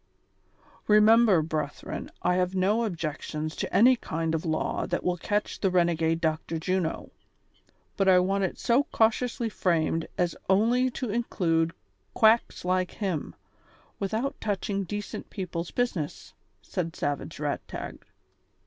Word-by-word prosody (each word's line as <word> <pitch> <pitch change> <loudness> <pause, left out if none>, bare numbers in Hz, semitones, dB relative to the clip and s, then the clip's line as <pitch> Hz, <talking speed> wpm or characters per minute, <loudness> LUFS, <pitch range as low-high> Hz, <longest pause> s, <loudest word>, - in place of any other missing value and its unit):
" - - -31
Remember, 215 -5 +6
brethren, 150 -2 -4
I 180 - +3
have 185 +1 0
no 205 +5 +2
objections 155 -3 -4
to - - -3
any 250 +4 +6
kind 165 -7 -3
of 160 - -1
a - - -4
law 155 -1 -1
that - - -2
will 180 - +1
catch 205 +4 -2
the 195 - +2
renegade 165 -2 +2
Dr. 160 0 -1
Juno, 175 0 -2 0.9
but 195 - +2
I 185 - +7
want 195 +2 +2
it 190 - -2
so 245 +5 +2
cautiously 230 +2 +1
framed 165 -5 0
as 175 -1 0
only 235 +6 +3
to 250 -2 -4
include 165 -8 0 0.4
quacks 220 -3 +3
like 185 0 0
him, 185 -8 -3 0.6
without 220 +7 -2
touching 200 -1 -1
decent 205 +2 -5
people's 175 -4 -4
business," 200 -12 -3 0.3
said 165 -2 -3
Savage 145 -1 -3
Eagtag. - - -4
185 Hz, 135 wpm, -27 LUFS, 165-215 Hz, 0.9 s, I